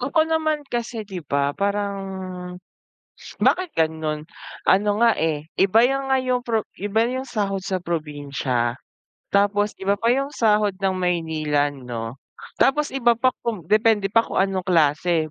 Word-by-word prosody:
Ako 295 +6 +2
naman 315 -2 0
kasi 235 -2 -3
di 190 -3 -7
ba, 140 -1 0
parang 200 +2 -1 1.4
bakit 370 -1 +2
gano'n, 160 -1 -1 0.4
ano 205 +2 +4
nga 230 0 +5
eh, 155 -2 -1 0.2
iba 200 +4 +5
'yung 270 +1 -1
nga 265 - +4
'yung 255 -1 0
pro 225 -3 -1
'yung 205 +2 -5
iba 220 +2 +1
yung 260 +2 -3
sahod 195 -5 -2
sa 190 0 -2
probinsya, 145 -8 -2 0.6
tapos 205 +1 +1
iba 195 +1 +1
pa 230 +4 0
'yung 275 +3 0
sahod 210 -3 +2
ng 195 0 0
Maynila 160 -5 0
'no, 125 -2 -7 0.4
tapos 295 +2 +2
iba 240 -3 +3
pa 255 +3 +2 0.2
kung 215 -7 -2
depende 215 -2 +3
pa 230 +1 +3
kung - - -7
anong 190 -2 -2
klase, 160 -1 +2
200 Hz, 155 wpm, -23 LUFS, 160-235 Hz, 1.4 s, nga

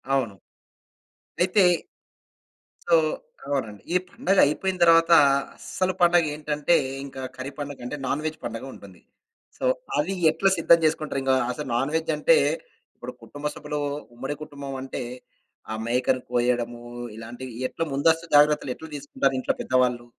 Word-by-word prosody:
అవును. 115 -7 -1 1.1
అయితే 185 +2 +4 1.2
సో, 170 - +2 0.5
అవునండి. 110 -8 -3
ఈ - - +5
పండగైపోయిన 190 - +2
తర్వాత 165 0 +6 0.5
అసలు 185 0 -2
పండగ 175 -1 +5
ఏంటంటే, 150 +2 +1 0.3
ఇంకా 135 -1 -8
కర్రీ 130 +2 -6
పండగ 145 -1 -5
అంటే 145 +4 -4
నాన్ 140 +3 -1
వేజ్ 155 0 -2
పండుగుంటుంది. 115 -5 -8 0.6
సో, - - -9 0.3
అది 160 +6 0 0.2
ఎట్లా 195 +5 +2
సిద్ధం 170 0 +5
చేసుకుంటారు? 155 -3 0
ఇంగా 130 0 +3 0.2
అసలు 145 +2 -5
నాన్ 135 +5 0
వేజ్ 160 0 0
అంటే - - +5 0.6
ఇప్పుడు - - -7
కుటుంబ 145 +1 -9
సభ్యులు 150 0 -4 0.4
ఉమ్మడి 135 +4 -4
కుటుంబమంటే, 135 -4 -6 0.7
ఆ - - -1
మేకను 125 +1 +1
కోయడము 120 -1 0 0.4
ఇలాంటివి 120 +3 -8 0.2
ఎట్లా 165 - -3
ముందస్తు 160 +4 +2
జాగ్రత్తలు 150 -3 +4
ఎట్లా 160 - -11
తీసుకుంటారు 140 -1 -1
ఇంట్లో - - 0
పెద్దవాళ్ళు? 125 -2 +1
145 Hz, 130 wpm, -25 LUFS, 130-160 Hz, 1.2 s, తర్వాత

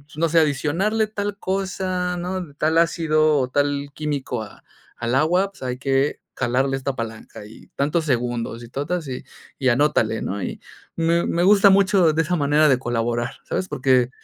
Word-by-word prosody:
no 165 +2 +1
sé, 165 +1 +4
adicionarle 165 +9 +1
tal 205 -1 -4
cosa, 185 -2 -2
¿no? 180 -4 -5
Tal 160 +2 +2
ácido 155 -3 +2
o 130 - +1
tal 145 0 -1
químico 140 -5 -3
a 105 -2 -11 0.4
al 115 +1 -2
agua, 175 +8 +2
pues 195 - -20
hay 125 -1 -3
que 135 +1 0 0.2
jalarle 135 +3 0
esta 135 0 -3
palanca 110 -3 -7
y 110 - -15
tantos 150 +3 0
segundos 120 -3 -2
y 120 - -11
totas 150 +5 -3
y 130 -1 -5 0.4
y 130 -2 +2
anótale," 120 -4 +2
¿no? 100 +1 -3
Y - - -5 0.4
me 170 +1 +1
me 170 - 0
gusta 200 +1 +6
mucho 190 -4 +4
de 160 - +2
esa 175 +3 -1
manera 150 0 +3
de 130 -2 +3
colaborar. 120 -1 -1
¿Sabes? 185 - -3
Porque 130 -4 +2
150 Hz, 175 wpm, -22 LUFS, 130-175 Hz, 0.4 s, gusta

